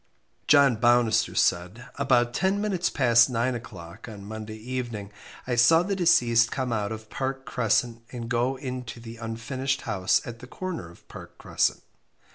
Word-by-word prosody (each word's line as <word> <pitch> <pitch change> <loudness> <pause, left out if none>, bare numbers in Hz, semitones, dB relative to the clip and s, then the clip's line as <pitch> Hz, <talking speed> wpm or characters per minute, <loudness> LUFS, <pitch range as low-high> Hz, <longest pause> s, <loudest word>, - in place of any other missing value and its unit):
John 140 -5 +5
Baunister 120 -1 +2
said 90 +8 0
About 125 -3 +1
ten 190 +5 +1
minutes 195 -4 0
past 120 -2 +4
nine 125 +1 0
o'clock 90 -6 -9
on 100 -2 -10
Monday 110 +1 -7
evening 120 -3 -5 0.3
I 125 - -2
saw 140 +8 +5
the 200 +2 -2
deceased 120 -10 +4
come 130 -3 -2
out 105 -2 -2
of 110 -1 -8
Park 135 0 -3
Crescent 120 -1 0
and 120 -2 -6
go 125 +2 0
into 125 -3 -6
the 115 0 -10
unfinished 130 +5 -3
house 95 -4 +1
at 115 -1 -8
the 125 - -11
corner 175 - -6
of 85 - -19
Park - - -12
Crescent. - - -1
120 Hz, 160 wpm, -26 LUFS, 110-130 Hz, 0.3 s, John